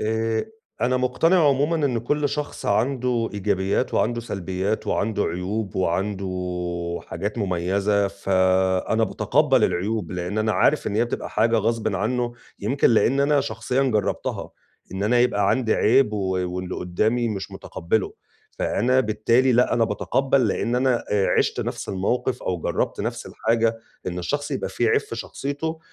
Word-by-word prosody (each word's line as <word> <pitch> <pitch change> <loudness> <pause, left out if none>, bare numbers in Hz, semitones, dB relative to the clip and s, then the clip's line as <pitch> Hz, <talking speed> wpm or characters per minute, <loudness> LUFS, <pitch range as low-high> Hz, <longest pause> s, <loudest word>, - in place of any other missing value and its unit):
آآ، 110 +1 0 0.4
أنا 125 +2 +2
مُقتنع 150 +6 +3
عمومًا 145 +4 +2
إن 125 -4 0
كل 145 +5 0
شخص 150 0 -4
عنده 125 +1 +1
إيجابيّات 95 -1 0
وعنده 120 +1 +1
سلبيّات 95 -1 -3
وعنده 105 0 0
عيوب 95 +4 -3
وعنده 95 +2 -1 0.8
حاجات 100 +7 -4
مميزة، 100 +2 +1
فأنا 95 +2 +1
باتقبَّل 130 +3 +2
العيوب، 100 0 -1
لإن 90 +4 -3
أنا 110 0 +1
عارف 155 - +2
إن 100 - -2
هي 115 - +3
بتبقى 120 - -4
حاجة 115 +2 +2
غصبٍ 110 -2 0
عنّه، 120 +4 -1 0.3
يمكن 125 +6 +2
لإن 130 +4 +3
أنا 145 0 +3
شخصيًا 120 +3 -1
جرّبتها، 105 -7 -1 0.4
إن 95 - -3
أنا 120 +4 +3
يبقى 120 -5 +2
عندي 120 -4 +1
عيب 120 -1 +3
و 105 - -2 0.4
واللي 90 0 -4
قُدّامي 110 +7 0
مش 100 -3 -4
مُتقبّله، 95 +4 -2 0.5
فأنا 125 +4 +2
بالتالي 115 +3 +2
لأ 125 +1 +3
أنا 115 - +3
باتقبَّل 130 +3 +1
لإن 120 +4 -1
أنا، 125 -2 +1
آآ 100 -2 +2
عِشت - - +1
نفس - - -4
الموقف 110 +7 -1
أو 90 - -1
جرّبت - - -1
نفس - - -4
الحاجة 115 0 0 0.3
إن 90 0 -3
الشخص 145 +12 -2
يبقى - - -2
في - - 0
عيب 440 -1 +3
في 430 - -8
شخصيته 160 +3 -4
110 Hz, 150 wpm, -23 LUFS, 100-125 Hz, 0.8 s, مُقتنع